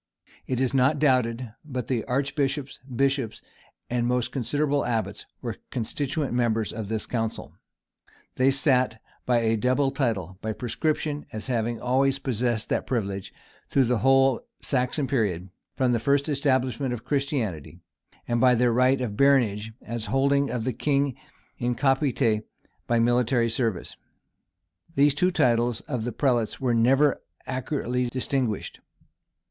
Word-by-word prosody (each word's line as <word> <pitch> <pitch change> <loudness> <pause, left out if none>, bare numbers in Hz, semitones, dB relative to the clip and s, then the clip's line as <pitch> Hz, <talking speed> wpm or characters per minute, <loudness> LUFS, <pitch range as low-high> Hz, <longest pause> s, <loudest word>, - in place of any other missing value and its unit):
It 130 -2 -1
is 130 0 +1
not 135 +3 +3
doubted 125 -5 +1
but 130 -6 -4
the 120 -4 -1
archbishops, 140 +1 -1
bishops, 135 -2 -1 0.5
and 120 -1 0
most 125 -1 0
considerable 145 +2 0
abbots 115 -2 -2 0.2
were - - -4
constituent 140 +5 -2
members 115 -3 0
of 110 -2 -5
this 110 -1 -2
council. 115 -2 -3 0.8
They 130 +1 +4
sat 130 -4 +2 0.3
by 120 -2 +3
a 115 0 +2
double 130 +5 +2
title: 100 - -2
by 110 0 -2
prescription, 150 +5 -2
as 110 0 -6
having 120 -2 -1
always 135 +2 +2
possessed 120 -4 -1
that - - -1
privilege, 100 -6 -2 0.4
through 135 - +3
the 120 -1 +1
whole 135 -1 +4 0.2
Saxon 130 +2 0
period, 100 -9 -1 0.3
from 130 -2 +2
the 120 - +2
first 140 +5 +2
establishment 130 -3 0
of 110 - -11
Christianity; 135 - -2 0.5
and 120 -1 0
by 125 -1 +6
their 120 0 +3
right 130 +2 +3
of 110 -5 -3
baronage, 110 -6 +3
as 115 0 -4
holding 140 +1 +2
of 120 -2 -2
the 130 +1 -1
king 140 0 0 0.4
in 120 0 0
capite 135 -4 +2 0.5
by 120 - +2
military 120 0 +2
service. 115 -5 -2 1.0
These 145 0 +5
two 180 +6 +2
titles 120 -8 +2
of 125 -7 -4
the 120 - -2
prelates 120 -3 0
were 125 -3 +1
never 135 +5 +3 0.2
accurately 130 -1 -2
distinguished. 125 -3 -2
125 Hz, 140 wpm, -26 LUFS, 115-135 Hz, 1.0 s, by